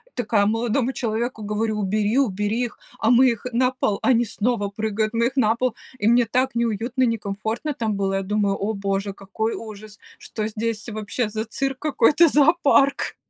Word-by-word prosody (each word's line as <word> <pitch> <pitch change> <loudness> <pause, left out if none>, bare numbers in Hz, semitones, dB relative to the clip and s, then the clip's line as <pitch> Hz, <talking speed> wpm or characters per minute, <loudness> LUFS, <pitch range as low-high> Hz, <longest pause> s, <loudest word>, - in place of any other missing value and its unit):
Такая 215 -4 +1
молодому 235 +3 0
человеку 225 -1 -3
говорю: 215 +1 -1
"Убери, 210 +4 0
убери 210 0 0
их!" 235 - -9 0.2
А 225 - +2
мы 250 +1 +6
их 230 0 -4
на 255 +1 +2
пол, 215 -6 -1
они 240 -2 +3
снова 215 -1 -1
прыгают, 215 +1 -2
мы 230 +1 +2
их 265 - -6
на 225 -2 +3
пол, 250 -1 -1 0.2
и 205 - -2
мне 240 +1 +5
так 255 +3 0
неуютно, 235 +3 0
некомфортно 225 +5 -2
там 220 -4 -2
было. 195 -1 -1
Я 195 - 0
думаю: 200 0 0
"О 210 +3 -2
Боже, 195 0 -2
какой 205 +3 -3
ужас!" 215 -1 -10 0.2
Что 215 -1 -5
здесь 220 +1 -4
вообще 215 +1 -3
за 220 +1 -3
цирк 270 +4 -3
какой-то, 305 +2 +4
зоопарк? 285 -2 +3
225 Hz, 175 wpm, -23 LUFS, 210-245 Hz, 0.2 s, мы